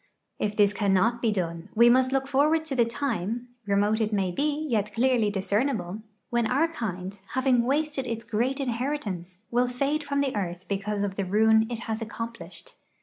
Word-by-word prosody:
If 210 0 -1
this 205 -1 +4
cannot 205 +4 +2
he 225 - +3
done, 170 -2 -3
we 235 +2 +7
must 255 +2 +4
look 270 0 0
forward 300 +4 +2
to 290 -4 -3
the 240 -2 +4
time 235 -1 -3
— 240 - -43
re 200 - +2
mote 210 +2 +2
it 215 0 0
may 195 -3 0
he, 295 - -1
yet 210 -5 0
clearly 240 -3 +3
discernible 205 0 -1
— - - -47
when 235 -1 +2
our 285 +6 +3
kind, 195 - -5
having 260 -2 +3
wasted 285 0 0
its 230 -1 -4
great 250 +6 0
inheritance, 235 - -3
will 245 +1 +2
fade 275 +5 -1
from 280 -1 0
the 270 -4 -1
earth 180 -2 -3
because 200 +1 -2
of 195 -1 -3
the 200 - 0
ruin 220 +3 +4
it 235 -2 -4
has 225 -1 -3
accomplished. 235 - -7
230 Hz, 195 wpm, -27 LUFS, 205-265 Hz, -, we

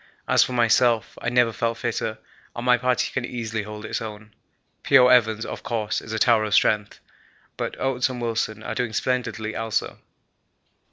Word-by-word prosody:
As - - +5
for 130 - -4
myself, 120 -1 +2
I 115 - -1
never 120 -2 +3
felt 115 +1 -1
fitter 115 -2 -3 0.4
and 120 - -5
my 125 0 +6
party 125 +1 0
can 130 - -2
easily 115 -3 -4
hold 105 +1 -8
its - - -3
own. 110 -1 -8 0.5
P.O. 130 -2 +6
Evans, 110 -3 +3
of - - -6
course, 110 -3 -2
is 115 - -9
a 110 - -2
tower 115 0 +4
of 105 -1 0
strength, 105 -1 +2 0.6
but - - -5
Oates 135 0 0
and 125 -1 -6
Wilson 110 -2 -2
are - - -4
doing 120 -3 -2
splendidly 115 -3 -2
also. 115 -1 -2
115 Hz, 175 wpm, -24 LUFS, 110-125 Hz, 0.6 s, my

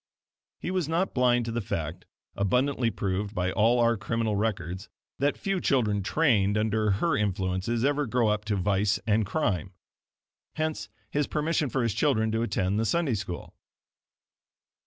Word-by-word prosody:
He 180 - -4
was 180 -5 -1
not 170 +4 0
blind 125 -2 +3
to 115 - -3
the 120 +1 -2
fact, 80 -4 -4 0.3
abundantly 125 +5 +1
proved 100 0 -3
by 90 0 0
all 115 +5 +3
our 115 -1 +3
criminal 110 +1 -1
records, 95 -3 -2 0.3
that 145 +2 +1
few 195 -2 -1
children 105 -7 +2
trained 105 -5 +2
under 105 -1 +1
her 165 - +1
influences 100 +3 0
ever 145 0 +1
grow 115 -1 +2
up 105 0 0
to 105 -1 0
vice 100 +2 +1
and 110 -1 +2
crime. 95 - -1 0.8
Hence 155 0 -2 0.2
his 145 -1 0
permission 150 -1 0
for 130 +2 0
his 115 -3 0
children 110 -7 +1
to 110 +1 0
attend 100 -3 0
the 115 - +1
Sunday 165 0 +1
School. 95 -4 -5
110 Hz, 155 wpm, -27 LUFS, 100-135 Hz, 0.8 s, blind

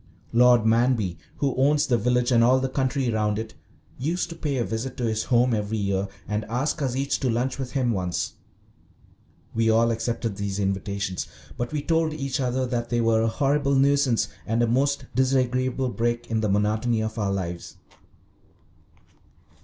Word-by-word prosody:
Lord 120 -1 +5
Manby, 115 -5 +2 0.2
who 140 -3 0
owns 145 +3 +3
the 130 -4 +2
village 125 +2 +1
and 115 -1 +5
all 130 +2 +5
the 135 - 0
country 130 -1 0
round 105 -1 0
it, 110 0 -5 0.5
used 165 +6 -1
to 165 - -7
pay 145 -5 -2
a 120 - +1
visit 115 +3 -4
to 125 - -3
his 110 -1 -1
home 125 0 +3
every 105 0 -1
year 100 -1 -1 0.2
and 105 +2 -1
ask 130 +8 -2
us 130 -3 -1
each 140 +1 0
to 130 - 0
lunch 125 +3 -1
with 130 -2 -5
him 130 -4 +1
once. 90 -4 -2 1.2
We 115 0 +2
all 115 +1 +4
accepted 115 -2 -2
these 100 -1 -3
invitations, 100 -1 -2 0.3
but 120 0 -3
we 150 -2 -2
told 160 0 +1
each 135 -3 -2
other 130 0 0
that 120 -2 -2
they 120 0 +1
were 115 -1 +3
a 115 - +2
horrible 140 +3 +1
nuisance 135 -5 +3 0.2
and 115 +2 +1
a - - +2
most 140 +3 +1
disagreeable 130 0 +1
break 120 -1 -2
in 110 -1 +1
the 105 - 0
monotony 110 +3 +1
of 110 +1 -4
our 100 -2 0
lives. 90 -3 -4
120 Hz, 175 wpm, -25 LUFS, 110-130 Hz, 1.2 s, Lord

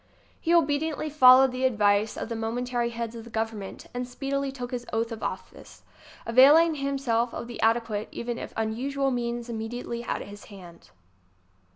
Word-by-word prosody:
He 330 - -1
obediently 310 -1 +1
followed 260 -2 +7
the 255 +1 -4
advice 210 -3 +2
of - - -4
the 230 - -4
momentary 240 +2 -2
heads 230 -1 -5
of 230 - -8
the 235 - -12
Government 220 -3 -4
and 245 0 -3
speedily 275 +2 -3
took 250 -2 -7
his 245 -1 -4
oath 230 +1 -1
of 225 - -5
officeŌĆö - - -7 0.4
availing 290 +8 +6
himself 275 -5 -1
of - - -5
the 240 -1 -8
ade 230 +1 +3
quate 210 -2 -4
even 235 0 -4
if - - -7
unusual 265 +5 -1
means 240 -1 -3
immediately 235 +1 -5
at - - -3
his 205 0 -11
hand. 180 -4 -14
240 Hz, 170 wpm, -26 LUFS, 225-270 Hz, 0.4 s, followed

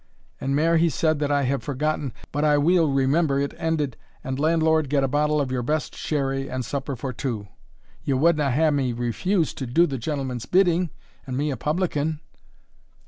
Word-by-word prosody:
And 135 +1 -1
mair 165 +3 +3
he 165 +1 +3
said 155 0 +1
that 145 -1 0
I 145 -1 +2
have 135 +1 0
forgotten, 145 0 -2 0.2
but 145 +2 -1
I 150 -1 +4
weel 165 +2 +3
remember 140 +2 +2
it 140 0 -1
ended, 150 -6 -1 0.3
'And, 130 +1 -3
landlord, 160 -1 +2
get 140 -1 +2
a - - +2
bottle 150 +2 +1
of 135 -3 -1
your 125 -1 -1
best 150 +5 -2
sherry, 135 -2 -2
and 130 -1 -3
supper 140 0 -3
for 130 +2 -5
two.' 110 -5 -4 0.5
Ye 135 - 0
wadna 155 +2 +3
have 135 - +1
had 155 +2 +3
me 130 -4 0
refuse 155 - 0
to 130 - -5
do 165 +9 +4
the 135 -5 -3
gentleman's 130 -3 -3
bidding, 180 -2 +3 0.4
and 130 -1 -3
me 145 +1 0
a - - -2
publican?" 155 +1 -1
145 Hz, 195 wpm, -24 LUFS, 135-155 Hz, 0.5 s, I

